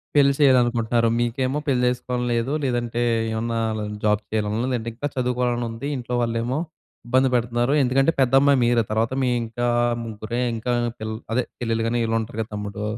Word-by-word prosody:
పెళ్లి 140 -1 +5
చెయ్యాలనుకుంటున్నారు. 120 -4 +3
మీకేమో 130 +4 0
పెళ్లి 125 -3 +2
చేసుకోవాలని 125 0 -2
లేదు. 115 +5 -1
లేదంటే 120 -2 -1 0.3
ఏమన్నా 115 +1 -1 0.4
జాబ్ 105 0 +2
చేయాలనుంది. 110 +2 -1
లేదంటే 115 -1 -2
ఇంకా 145 +4 -2
చదువుకోవాలనుంది. 125 -1 -1
ఇంట్లో 125 0 -4
వాళ్ళేమో 115 +3 -1 0.5
ఇబ్బంది 130 +2 +3
పెడతున్నారు. 120 +2 +1
ఎందుకంటే 135 +4 +3
పెద్ద 130 0 +2
అమ్మాయి 140 0 +4
మీరే. 120 -1 +3
తరవాత 115 +3 0
మీ 125 - +2
ఇంకా 120 +2 -3 0.4
ముగ్గురే 110 +2 -4
ఇంకా 115 +2 -2 0.3
పిల్ 110 0 -4 0.2
అదే 125 - +2 0.2
చెల్లెళ్ళు 115 -1 -1
గాని 120 +1 0
వీళ్ళుంటారు 115 -1 -2
కదా! 110 - -5
తమ్ముడు 105 0 -5
120 Hz, 155 wpm, -23 LUFS, 115-125 Hz, 0.5 s, పెళ్లి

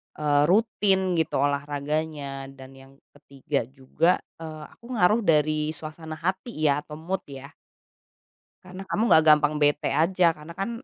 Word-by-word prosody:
eee, 145 -1 +2
rutin 195 -1 +2
gitu 160 - -1
olahraganya. 145 0 -3
Dan 135 -1 -13
yang 135 0 -16 0.2
ketiga 140 -2 -4
juga, 135 +6 0 0.3
eee, 155 -1 -8
aku 240 +1 -9
ngaruh 210 +3 +3
dari 155 -4 +1
suasana 160 0 -8
hati, 185 +9 -4
ya, 145 -1 +3
atau 150 0 -10
mood, 180 +5 -3
ya. 140 +1 -10 1.1
Karena 185 +1 -10
kamu 185 +3 -1
enggak 160 - +7
gampang 150 0 +5
bete 145 0 +1
aja 170 +3 +3
karena 155 +1 -11
kan 195 +4 -3
155 Hz, 145 wpm, -25 LUFS, 145-180 Hz, 1.1 s, enggak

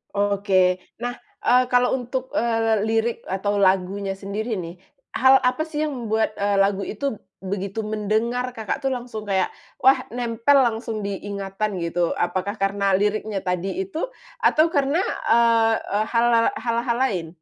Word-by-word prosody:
Oke, 195 -2 +2 0.2
nah, 245 +1 -3 0.3
eee, 250 +1 +5
kalau 245 0 +3
untuk, 260 +1 -3
eee, 225 -5 +1
lirik 225 +2 0
atau 200 +2 0
lagunya 195 +1 +1
sendiri 210 +3 -3
nih, 175 +1 -7 0.3
hal 265 +1 +6
apa 255 +5 +1
sih 310 -1 -2
yang 295 - -3
membuat, 220 -3 -1
eee, 200 -1 0
lagu 195 0 +2
itu 230 +7 -3 0.3
begitu 200 +2 -4
mendengar, 220 +4 -1
Kakak 220 -3 -3
tuh 270 - 0
langsung 245 -4 -5
kayak, 190 -1 +1 0.2
wah, 265 0 +4
nempel 240 +3 +2
langsung 220 -2 -3
di 200 - -2 0.2
ingatan 200 0 -3
gitu, 170 0 0
apakah 185 +4 -1
karena 195 0 0
liriknya 210 0 -1
tadi 190 - -2
itu 390 +5 -4 0.3
atau 310 - +4
karena, 285 +2 +2 0.3
eee 230 -1 +4
eee, 210 +2 -2
hal 235 0 +2
al 230 0 +4
hal-hal 235 +1 -1
lain? 190 -11 0
220 Hz, 150 wpm, -23 LUFS, 195-245 Hz, 0.3 s, hal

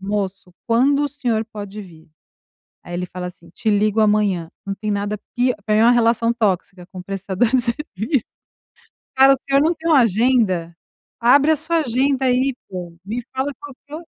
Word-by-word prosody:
"Moço, 195 -2 -4
quando 260 +5 +3
o - - -1
senhor 245 -6 -2
pode 205 0 -7
vir?", 165 -4 -16 0.7
aí 175 - -8
ele 180 +1 -2
fala 180 0 -7
assim: 175 -1 -12
"Te 220 - -4
ligo 210 +1 +2
amanhã". 205 -6 +1 0.2
Não 195 - -2
tem 215 +2 -4
nada 205 +1 -2 0.2
pi 250 +1 +2
pra 215 - +2
mim 215 - +4
é - - +5
uma 235 - +6
relação 230 -1 +2
tóxica 195 -5 -2
com 185 0 -10
o - - -11
prestador 195 +3 -1
de 260 0 +3
serviço. 235 - -1 0.9
"Cara, 270 +1 +7
o - - +3
senhor 275 0 +2
não 320 +3 +3
tem 325 +1 -5
uma 295 -4 +6
agenda? 215 -6 +1 0.5
Abre 280 +6 +5
a - - +2
sua 335 +3 +1
agenda 265 -1 +1
aí, 255 +1 +2
pô, 180 -3 -7
me 225 +5 -4
fala 265 +2 -1
qualquer 290 +3 -11
220 Hz, 185 wpm, -20 LUFS, 195-260 Hz, 0.9 s, Cara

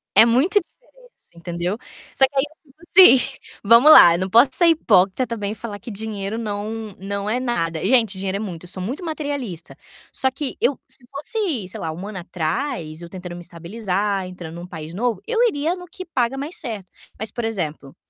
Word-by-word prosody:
É 225 - +9
muita 275 - +3
diferença, - - -21
entendeu. 175 +3 -3 0.4
Só 270 - +6
que 280 - -24
aí 270 - +3
eu 310 -2 -25
fico 310 +5 -25 0.5
assim, 270 - -13 0.2
vamos 235 +8 +7
lá, 170 - +9
não 185 +2 -2
posso 235 +7 +6
ser 345 +5 +4
hipócrita 225 - +3
também 210 -3 -3
e - - -5
falar 215 -3 -7
que 230 - -9
dinheiro 210 0 -4
não 215 -1 -5
não 200 +1 -4
é 240 +3 0
nada. 165 -11 -2
Gente, 225 -4 +3
dinheiro 195 0 -2
é - - -5
muito 180 -5 -6
sou 185 - -4
muito 260 - -4
materialista. 285 - -5 0.4
Só 265 - +1
que 275 0 -4
eu 255 +3 +1
se 260 -1 -16
fosse, 300 - -2
sei - - -9
lá, 160 - -3
um 180 +5 -7
ano 205 -3 -6
atrás, 170 - -3
eu 170 - -9
tentando 180 -1 -8
me 175 - -8
estabilizar, 190 +3 -2
entrando 175 -3 -9
num 175 +1 -8
país 160 -2 -8
novo, 225 -1 -1
eu 460 -1 0
iria 320 -3 -1
no 360 -1 -10 0.3
paga 250 +1 +1
mais 290 +6 -5
certo. 220 - -5 0.3
Mas 220 0 -3
por 240 - -4
exemplo, 160 -10 -4
215 Hz, 195 wpm, -21 LUFS, 180-265 Hz, 0.5 s, É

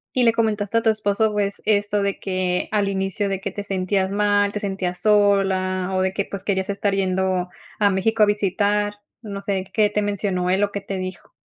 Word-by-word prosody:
Y 250 - +3
le 230 - +5
comentaste 220 -1 0
a - - -1
tu 225 - +4
esposo, 215 0 +1
pues, 200 -1 -2
esto 205 -1 +1
de 200 -1 -1
que 185 -2 -1
al 205 -2 +2
inicio 195 +1 -1
de 195 -1 -2
que 195 -1 -4
te 205 - -5
sentías 190 0 0
mal, 205 0 +2
te 210 - -4
sentías 190 -3 -3
sola, 195 -3 +2
o 185 - +1
de 190 0 0
que, 200 0 -1
pues, 200 -2 -7
querías 190 -1 -1
estar 200 0 0
yendo 185 -1 0 0.3
a 205 -1 +4
México 215 +3 +2
a - - +2
visitar, 205 +1 +1 0.3
no 200 -3 -6
sé, 195 -1 -1
¿qué 210 -1 +3
te 210 0 -1
mencionó 195 -3 -1
él 195 +2 +3
o 200 - -3
qué 200 - -3
te 195 0 -5
dijo? 185 -1 -7
200 Hz, 215 wpm, -22 LUFS, 190-205 Hz, 0.3 s, le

